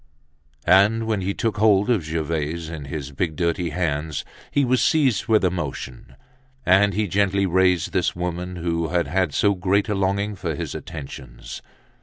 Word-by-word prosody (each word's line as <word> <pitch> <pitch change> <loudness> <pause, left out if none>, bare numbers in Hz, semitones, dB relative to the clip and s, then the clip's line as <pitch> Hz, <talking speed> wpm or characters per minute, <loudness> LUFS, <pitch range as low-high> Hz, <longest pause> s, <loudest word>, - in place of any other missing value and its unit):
And 100 +5 +4
when 110 -3 -1
he 95 +2 -2
took 115 -3 -1
hold 105 -2 +4
of 105 -8 +1
Gervaise 80 0 -3
in 75 -4 -6
his 70 0 -5
big, 80 +2 -2
dirty 85 0 0
hands, 75 -3 -2 0.2
he 140 -1 +2
was 130 0 +2
seized 140 -8 +2
with 110 -3 +3
emotion, 70 -7 -4 0.5
and 95 +1 +4
he 105 0 0
gently 100 +1 +1
raised 90 -1 +2
this 90 - +1
woman 90 +1 -4
who 85 -1 -1
had 85 0 0
had 95 -4 0
so 100 +8 +2
great 100 +3 +1
a - - +1
longing 100 +2 0
for 85 -5 -3
his - - -4
attentions. 65 -6 -8
90 Hz, 165 wpm, -23 LUFS, 80-100 Hz, 0.5 s, And